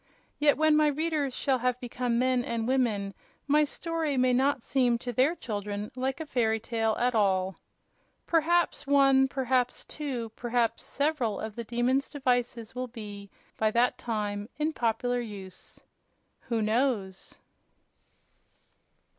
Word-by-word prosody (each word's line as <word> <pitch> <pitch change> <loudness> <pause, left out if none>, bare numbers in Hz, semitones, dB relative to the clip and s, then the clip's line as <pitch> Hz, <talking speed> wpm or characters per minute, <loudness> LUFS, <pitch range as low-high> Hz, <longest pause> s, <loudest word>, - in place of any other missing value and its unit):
Yet 295 -1 +4
when 310 0 +4
my 305 0 +4
readers 295 -3 -1
shall 265 -2 +1
have 250 0 0
become 245 -1 -2
men 255 0 +2
and 230 -2 -2
women 225 -7 +1 0.3
my 300 +1 +4
story 315 -1 -2
may 255 0 +3
not 265 0 +2
seem 250 -3 +2
to 245 +1 -5
their 270 +8 +3
children 205 - -4
like 265 +1 -2
a 320 - -4
fairy 225 -6 +1
tale 225 -1 -1
at 245 +1 +1
all. 190 -3 +1 0.7
Perhaps 340 -1 +2
one, 275 -1 +5
perhaps 255 -2 0
two 260 -7 -4
perhaps 235 -1 0
several 280 -7 -1
of 220 -1 -5
the 235 - -4
Demon's 245 +4 0
devices 245 -5 -1
will 255 +1 -3
be, 205 -4 -9 0.3
by 220 - +2
that 235 +3 +2
time, 210 -2 -3
in 310 +1 0
popular 245 +1 0
use. 195 -5 -9 0.7
Who 230 -2 +1
knows? 215 -4 -1
245 Hz, 140 wpm, -28 LUFS, 225-275 Hz, 0.7 s, one